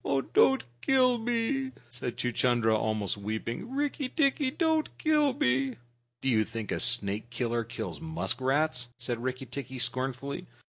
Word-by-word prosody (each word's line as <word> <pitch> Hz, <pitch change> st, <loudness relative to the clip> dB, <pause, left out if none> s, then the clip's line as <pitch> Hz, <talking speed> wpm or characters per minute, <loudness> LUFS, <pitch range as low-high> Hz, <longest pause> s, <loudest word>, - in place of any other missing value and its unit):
"Don't 270 Hz, 0 st, +5 dB, 0.2 s
kill 255 Hz, -, +4 dB
me," 245 Hz, +3 st, 0 dB, 0.2 s
said 120 Hz, -1 st, -5 dB
Chuchundra, 120 Hz, -1 st, +2 dB
almost 110 Hz, -2 st, 0 dB
weeping. 110 Hz, -, -4 dB
"Rikki 285 Hz, -1 st, -1 dB
tikki, 275 Hz, -2 st, +2 dB
don't 320 Hz, +1 st, +1 dB
kill 300 Hz, -2 st, +3 dB
me!" 130 Hz, -, +1 dB, 0.5 s
"Do 135 Hz, -, 0 dB
you 110 Hz, -3 st, +4 dB
think 115 Hz, -1 st, -5 dB
a -, -, 0 dB
snake 110 Hz, -2 st, +2 dB
killer 120 Hz, -1 st, -1 dB
kills 115 Hz, +7 st, -6 dB
muskrats?" 135 Hz, -3 st, 0 dB
said 120 Hz, -1 st, -3 dB
Rikki 130 Hz, +1 st, -3 dB
tikki 130 Hz, +1 st, -6 dB
scornfully. 130 Hz, +3 st, -2 dB
130 Hz, 135 wpm, -29 LUFS, -, 0.5 s, Don't